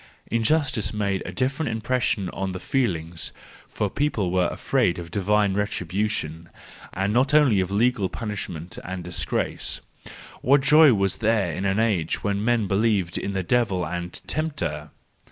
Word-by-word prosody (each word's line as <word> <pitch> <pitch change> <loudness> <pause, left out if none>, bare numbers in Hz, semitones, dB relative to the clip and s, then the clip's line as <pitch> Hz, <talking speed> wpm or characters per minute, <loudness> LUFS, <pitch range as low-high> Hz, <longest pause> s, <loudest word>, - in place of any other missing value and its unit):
Injustice 115 -3 +1
made 100 -2 0
a - - -4
different 130 - -1
impression 110 -3 0
on 95 -1 -3
the 95 - -5
feelings: 85 - -1 0.4
for 105 - -2
people 105 -6 -1
were 90 -1 +2
afraid 85 - 0
of 85 -1 -7
divine 100 +1 +2
retribution, 95 -4 -2 0.4
and 95 +3 0
not 135 +5 +3
only 135 -10 +5
of 95 -1 0
legal 105 -1 +1
punishment 95 -6 -5
and 95 0 -5
disgrace. 90 0 -2 0.6
What 140 +3 +4
joy 150 -2 +7
was 95 -2 0
there 110 -6 +1
in 95 - -3
an 95 +2 +1
age 100 -8 0
when 100 0 0
men 120 -2 +2
believed 100 -3 +1
in 100 - -3
the 95 -1 -1
devil 100 -4 +1
and 90 +2 -5
tempter! 140 - -2
100 Hz, 150 wpm, -24 LUFS, 90-115 Hz, 0.6 s, joy